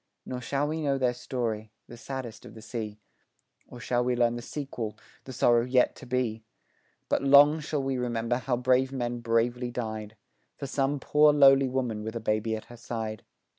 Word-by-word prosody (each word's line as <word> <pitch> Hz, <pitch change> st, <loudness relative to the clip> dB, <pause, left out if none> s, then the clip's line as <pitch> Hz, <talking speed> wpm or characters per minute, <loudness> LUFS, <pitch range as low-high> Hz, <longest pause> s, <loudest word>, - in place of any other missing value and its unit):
Nor 125 Hz, -1 st, -5 dB
shall 140 Hz, +3 st, -1 dB
we 160 Hz, +1 st, -3 dB
know 140 Hz, -2 st, +1 dB
their 125 Hz, -2 st, +1 dB
story, 115 Hz, -3 st, -3 dB, 0.2 s
the 120 Hz, -, -10 dB
saddest 125 Hz, -2 st, -7 dB
of -, -, -12 dB
the 110 Hz, -, -11 dB
sea, 110 Hz, -2 st, -5 dB, 0.7 s
Or 125 Hz, -, -11 dB
shall 120 Hz, 0 st, 0 dB
we 125 Hz, 0 st, +1 dB
learn 120 Hz, -1 st, +2 dB
the 120 Hz, -, -5 dB
sequel, 120 Hz, -5 st, -5 dB, 0.3 s
the 130 Hz, -, -8 dB
sorrow 120 Hz, -1 st, +3 dB
yet 125 Hz, 0 st, +2 dB
to -, -, -11 dB
be, 120 Hz, -3 st, -1 dB, 0.6 s
But -, -, +1 dB
long 145 Hz, +3 st, +6 dB
shall 150 Hz, -2 st, -2 dB
we 135 Hz, -1 st, -1 dB
remember 120 Hz, 0 st, -1 dB
how 125 Hz, -1 st, -1 dB
brave 130 Hz, +1 st, +2 dB
men 120 Hz, -2 st, -3 dB
bravely 120 Hz, +2 st, 0 dB
died 110 Hz, -3 st, -5 dB, 0.4 s
For 140 Hz, -, -5 dB
some 140 Hz, +1 st, 0 dB
poor, 150 Hz, +2 st, +5 dB
lowly 135 Hz, -2 st, +6 dB
woman 125 Hz, -5 st, -2 dB
with 110 Hz, +2 st, -5 dB
a -, -, -2 dB
baby 110 Hz, 0 st, 0 dB
at 110 Hz, -, -8 dB
her 120 Hz, -, -13 dB
side. 110 Hz, -2 st, -5 dB
125 Hz, 190 wpm, -28 LUFS, 115-135 Hz, 0.7 s, long